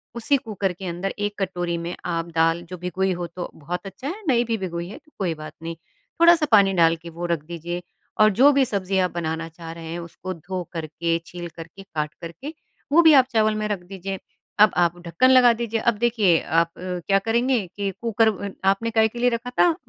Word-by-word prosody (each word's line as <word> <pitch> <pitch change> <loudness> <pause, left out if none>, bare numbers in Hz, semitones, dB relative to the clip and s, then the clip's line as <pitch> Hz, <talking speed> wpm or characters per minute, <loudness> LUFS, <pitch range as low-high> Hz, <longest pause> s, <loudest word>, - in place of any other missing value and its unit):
उसी 275 +5 +2
कुकर 205 -7 -3
के 190 +2 -9
अंदर 175 +3 -3
1 205 0 -2
कटोरी 175 -2 -2
में 170 +1 -4
आप 165 -1 -1
दाल 165 +1 +3
जो 180 - -6
भिगोई 185 +2 -1
हो 175 0 -4
तो 175 +1 -6
बहुत 175 +6 -5
अच्छा 255 +8 -7
है, 405 +7 -5
नहीं 240 -2 +3
भी 225 -1 -1
भिगोई 170 -2 -4
है - - -9 0.2
कोई 175 -4 0
बात 155 0 -9
नहीं। 165 0 -4 0.5
थोड़ा 340 +1 +9
सा 315 -2 0
पानी 200 -2 +6
डाल 165 -2 +4
के 165 +1 -11
वो 170 +2 -6
रख 170 -3 -1
दीजिए 175 +1 -5 0.4
और 215 - +7
जो 285 +2 +8
भी 275 - +4
सब्ज़ियाँ 190 -3 0
आप - - -16
बनाना 165 -1 -3
चाह 165 0 -10
रहे 165 0 -9
हैं 175 - -4
उसको 170 +2 -7
धो 180 +2 -5
करके, 165 +1 -2
छील 175 0 -7
करके, 165 +4 -10
काट 150 -5 -4
करके, 255 - -7 0.4
वो 335 +4 +7
भी 320 -2 +7
आप 265 -3 +7
चावल 215 -1 +2
में 215 0 -1
रख 205 -2 -2
दीजिए। 195 +1 -6 0.4
अब 210 -1 +7
आप 175 0 +2
ढक्कन 170 +10 +3
लगा 250 -2 +7
दीजिए। 230 -1 -2
अब 235 +1 +2
देखिए 220 -7 +3
आप 165 +1 +2
अ, - - -11 0.3
क्या 195 0 +4
करेंगे 235 +4 +1 0.2
कि 200 -1 -1
कुकर 225 -1 +2 0.2
अन 200 - -5
आपने 195 +4 +2
काहे 220 0 +4
के 235 +2 -9
लिए 245 +1 +4
रखा 235 +1 -3
था? 345 -2 +5
190 Hz, 225 wpm, -23 LUFS, 170-225 Hz, 0.5 s, थोड़ा